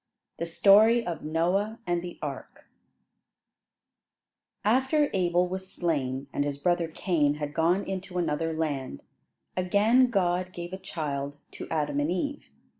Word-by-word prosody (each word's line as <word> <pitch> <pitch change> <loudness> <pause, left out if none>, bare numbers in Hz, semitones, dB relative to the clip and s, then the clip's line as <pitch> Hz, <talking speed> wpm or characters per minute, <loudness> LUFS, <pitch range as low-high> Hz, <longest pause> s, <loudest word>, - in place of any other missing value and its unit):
THE 170 - -2
STORY 215 +7 +5
OF 170 -3 -4
NOAH 180 +8 0
AND 175 -1 0
THE 175 0 -8
ARK 140 -3 -7 2.0
After 265 +6 +3
Abel 180 -1 +2
was 190 +1 -6
slain, 135 -6 -1
and 145 - +1
his 145 -1 -3
brother 175 +2 +1
Cain 155 -3 +1
had 150 -1 -5
gone 175 +6 +2
into 190 -1 -5
another 165 -1 0
land, 145 - -3 0.5
again 210 +8 +4
God 185 -3 0
gave 175 +1 -7
a - - -3
child 145 -5 -4
to - - -8
Adam 150 -2 0
and 145 +2 0
Eve. 280 +12 -3
175 Hz, 135 wpm, -28 LUFS, 150-190 Hz, 2.0 s, STORY